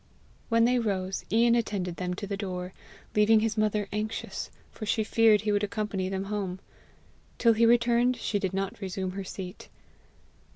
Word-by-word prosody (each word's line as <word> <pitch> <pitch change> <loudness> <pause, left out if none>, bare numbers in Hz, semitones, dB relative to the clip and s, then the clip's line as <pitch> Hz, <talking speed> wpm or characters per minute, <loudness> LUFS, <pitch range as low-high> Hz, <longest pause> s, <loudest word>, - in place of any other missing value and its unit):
When 230 0 +4
they 250 +1 +3
rose, 190 -4 -2
Ian 235 +1 +4
attended 200 -7 -1
them 180 -1 -2
to 205 - -5
the 200 0 -3
door, 185 -2 -5 0.4
leaving 215 +1 +5
his 225 -1 0
mother 215 -1 +1
anxious, 215 +1 -4 0.2
for - - -9
she 220 0 +1
feared 220 -1 +4
he 210 0 0
would 205 0 +1
accompany 205 -3 -2
them 190 0 -2
home. 195 -2 -3 0.8
Till 230 -2 +5
he 230 +1 +4
returned, 240 +1 +4
she 215 -2 -1
did 190 -2 -1
not 195 0 -3
resume 190 -1 -3
her 195 +1 -5
seat. 185 0 -8
210 Hz, 170 wpm, -28 LUFS, 190-225 Hz, 0.8 s, leaving